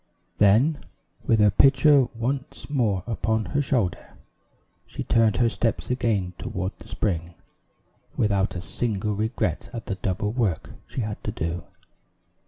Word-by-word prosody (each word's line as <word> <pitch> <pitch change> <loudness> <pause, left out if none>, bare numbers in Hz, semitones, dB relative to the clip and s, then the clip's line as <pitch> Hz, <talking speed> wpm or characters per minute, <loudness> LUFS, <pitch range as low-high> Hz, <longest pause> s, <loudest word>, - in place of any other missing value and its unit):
Then, 115 +10 +4 0.5
with 115 - +4
her 105 -1 +6
pitcher 135 +3 +5
once 130 +4 -3
more 110 - +1
upon 110 -1 -1
her 145 - +2
shoulder, 120 -10 -1 0.7
she - - -5
turned 110 -3 +3
her 120 - +4
steps 115 +1 -1
again 105 -8 0
toward 95 +1 -3
the - - -13
spring, 85 -4 -2 0.8
without 100 -2 +1
a 90 - -3
single 105 0 -2
regret 110 +2 -2
at 115 -2 -6
the - - -2
double 95 +2 -2
work 105 -9 -1 0.2
she 130 - -4
had 105 -2 -5
to - - -2
do. 85 +1 -3
110 Hz, 140 wpm, -25 LUFS, 95-120 Hz, 0.8 s, her